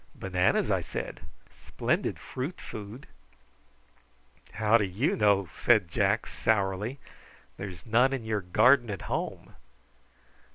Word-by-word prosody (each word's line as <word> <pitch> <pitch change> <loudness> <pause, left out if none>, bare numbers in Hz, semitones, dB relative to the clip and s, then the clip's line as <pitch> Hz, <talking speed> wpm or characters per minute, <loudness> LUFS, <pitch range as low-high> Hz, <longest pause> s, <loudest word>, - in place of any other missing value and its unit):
"Bananas," 90 -1 +1
I - - +2
said. - - -6 0.3
"Splendid - - -2
fruit 135 +8 -6
food." 110 +5 -9 1.5
"How 110 +1 +3
do - - +1
you 100 - 0
know?" 100 -3 +3
said 110 -7 +3
Jack 105 +2 +1
sourly. 105 +3 -1 0.6
"There's 95 -4 -8
none 120 +4 +3
in 130 -4 -3
your 110 -2 -1
garden 120 +7 +4
at 100 -3 -5
home." - - -4
105 Hz, 115 wpm, -28 LUFS, 95-120 Hz, 1.5 s, garden